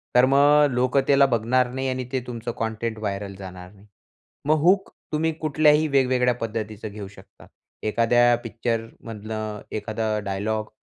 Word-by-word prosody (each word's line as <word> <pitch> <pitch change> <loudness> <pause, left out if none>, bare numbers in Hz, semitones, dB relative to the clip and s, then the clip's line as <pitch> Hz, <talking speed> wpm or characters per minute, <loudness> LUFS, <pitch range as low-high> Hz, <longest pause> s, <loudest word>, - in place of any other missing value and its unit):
तर 125 +1 +7
मग 145 +2 +5
लोक 125 +2 +1
त्याला 140 0 +6
बघणार 125 0 +1
नाही 130 +1 -2
आणि 130 0 -3
ते 130 -1 -1
तुमचं 120 -1 -5
कंटेंट 110 0 -3
व्हायरल 100 -2 -4
जाणार 90 -1 -9
नाही. 100 0 -19 0.6
मग 155 +1 +3
हूक 190 +4 +3 0.2
तुम्ही 160 +1 +1
कुठल्याही 155 0 +3
वेगवेगळ्या 130 -3 +2
पद्धतीचं 110 -2 -5
घेऊ 100 -1 -7
शकता. 100 - -17 0.4
एखाद्या 120 +2 +3
पिक्चर 115 0 -2 0.2
मधलं, 110 -1 -5
एखादा 110 0 -2
डायलॉग 105 +2 -2
115 Hz, 145 wpm, -24 LUFS, 110-130 Hz, 0.6 s, तर